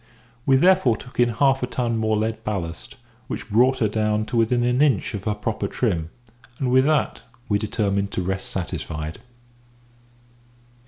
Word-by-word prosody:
We 135 - +6
therefore 175 - +4
took 125 - -12
in 120 0 +5
half 135 +3 +2
a 125 - -1
ton 120 -2 -1
more 110 -1 +1
lead 110 +1 -2
ballast, 90 -7 -4 0.3
which 115 - -6
brought 125 +5 +4
her 110 - +2
down 105 0 0
to 120 - -5
within 120 +1 +2
an 125 +2 +2
inch 135 -7 +2
of 100 -2 -5
her 105 -1 0
proper 105 -1 -2
trim, 85 -9 -1 0.5
and 130 -2 -1
with 130 +1 +5
that 150 -6 +1 0.3
we 105 -2 +1
determined 100 -2 -1
to 90 - -1
rest 95 +1 -2
satisfied. 80 -2 -4
110 Hz, 165 wpm, -23 LUFS, 100-125 Hz, 0.5 s, We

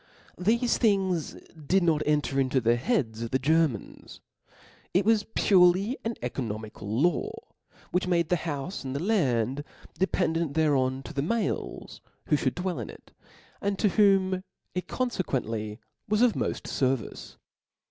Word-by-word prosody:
Thefe 235 +6 +2
things 190 - +1 0.2
did 165 +5 +1
nor 165 -3 +3
enter 150 -2 +1
into 130 0 +2
the 120 -1 +3
heads 120 - -1
of 115 - -3
the 130 - +2
Germans; 150 -4 0 0.8
ic 190 +1 +3
was 220 -1 +3
purely 190 +4 +4
an 230 0 -2
oeco 135 - -2
nomical 110 0 -5
law, 285 - +1 0.6
which 180 0 0
gave 170 -2 +2
the 180 - +3
houfe 160 +2 -4
and 130 0 -4
the - - -1
land 135 - +1 0.4
dependent 165 -5 0
thereon, 135 -4 +2
to 130 - -9
the 140 - -1
males 225 +10 -3 0.3
who 155 - +5
ihould 130 -3 0
dwell 180 0 -2
in - - -5
ic, - - -14 0.5
and 200 0 -1
to 210 - +3
whom 190 -2 +3 0.3
it 180 - -3
confcquently 115 - -2 0.3
was 210 +3 +3
of 245 -3 +5
moft - - -2
fcrvice. 130 -4 -2
165 Hz, 145 wpm, -27 LUFS, 130-195 Hz, 0.8 s, who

